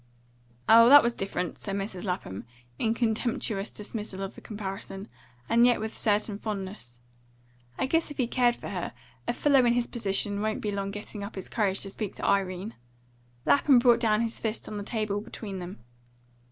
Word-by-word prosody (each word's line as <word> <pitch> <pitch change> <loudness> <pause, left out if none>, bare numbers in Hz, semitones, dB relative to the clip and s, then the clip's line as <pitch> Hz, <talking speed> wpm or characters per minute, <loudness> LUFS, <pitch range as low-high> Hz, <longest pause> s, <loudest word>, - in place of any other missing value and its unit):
"Oh, 230 +1 +8
that 290 +1 +10
was 235 0 +2
different," 195 -4 -3
said 195 -2 -4
Mrs. 195 -1 -4
Lapham, 180 - -3 0.4
in 225 0 +1
contemptuous 220 -3 -1
dismissal 210 -2 -6
of 195 - -5
the - - -13
comparison, 195 -1 -6 0.4
and 235 +1 +4
yet 245 0 +5
with 220 +1 -4
a - - -10
certain 210 -1 +1
fondness. 190 - -6 0.8
"I - - +1
guess, 325 +5 +1
if 295 - -9
he 255 - +2
cared 240 0 +2
for - - -8
her, 180 -9 -4 0.3
a - - +1
fellow 275 0 +4
in 240 -1 +4
his 240 0 +1
position 205 -3 -2
wouldn't 215 0 -1
be 210 - -1
long 200 -1 -2
getting 205 0 -7
up 200 - -7
his 190 - -6
courage 200 -4 0
to 195 - -3
speak 210 -1 -5
to - - -5
Irene." 195 +1 0 0.7
Lapham 285 -2 +5
brought 240 -1 +5 0.2
his 230 -1 -1
fist 220 0 -2
down - - -7
on - - -4
the - - -4
table 210 -2 -2
between 205 -2 -7
them. 180 +1 -7
210 Hz, 190 wpm, -28 LUFS, 195-235 Hz, 0.8 s, that